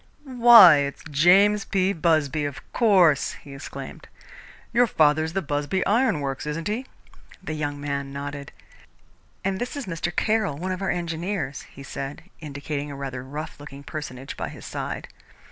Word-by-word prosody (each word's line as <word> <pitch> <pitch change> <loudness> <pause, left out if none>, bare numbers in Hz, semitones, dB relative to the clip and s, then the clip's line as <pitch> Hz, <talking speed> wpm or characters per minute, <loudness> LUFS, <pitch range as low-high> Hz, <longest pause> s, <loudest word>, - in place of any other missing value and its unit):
"Why, 240 - +8
it's 140 0 -3
James 195 +8 +5
P. 190 0 +1
Busby, 155 -3 +1
of 145 -2 -5
course!" 185 - +4
he 140 - -12
exclaimed. 135 - -9 0.7
"Your 240 +1 +4
father's 155 -2 +2
the 195 0 -1
Busby 145 +5 -1
Iron 215 - +2
Works, 135 +1 -4
isn't 160 +4 -3
he?" 235 +6 -3 0.6
The 160 - -4
young 145 -2 -3
man 140 -1 -3
nodded. 140 0 -6 0.9
"And 190 -1 -1
this 245 - -3
is 280 - -4
Mr. 170 -1 -3
Caroll, 215 -9 +1
one 185 +4 -3
of 185 +1 -4
our 195 - -1
engineers," 170 -3 -3
he 140 - -12
said, 135 +2 -6 0.2
indicating 145 -1 -5
a 140 - -7
rather 135 -2 -5
rough 150 +4 -7
looking 140 -1 -10
personage 135 -3 -7
by - - -4
his - - -11
side. - - -5
155 Hz, 160 wpm, -24 LUFS, 140-190 Hz, 0.9 s, Why